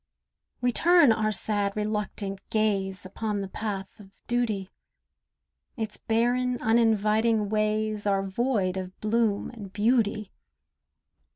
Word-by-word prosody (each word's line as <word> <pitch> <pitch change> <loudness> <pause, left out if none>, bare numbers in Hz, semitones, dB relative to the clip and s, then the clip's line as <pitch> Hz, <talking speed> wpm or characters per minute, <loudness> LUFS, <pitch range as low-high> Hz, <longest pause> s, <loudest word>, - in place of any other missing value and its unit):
We 245 0 +2
turn 340 -1 +5
our 215 -1 +1
sad, 205 -1 0
reluctant 210 -2 -3
gaze 195 -3 0
Upon 205 +2 -3
the 195 - -4
path 195 -1 -5
of 200 -2 -13 0.2
duty; 220 -6 -1 1.1
Its 220 -2 -4
barren, 245 +2 +1
uninviting 220 -1 +2
ways 215 0 0
Are 195 -1 +2
void 195 -2 0
of 185 0 -6
bloom 215 -1 0
and 210 -5 -10
beauty. 215 -1 +1
215 Hz, 110 wpm, -27 LUFS, 200-225 Hz, 1.1 s, turn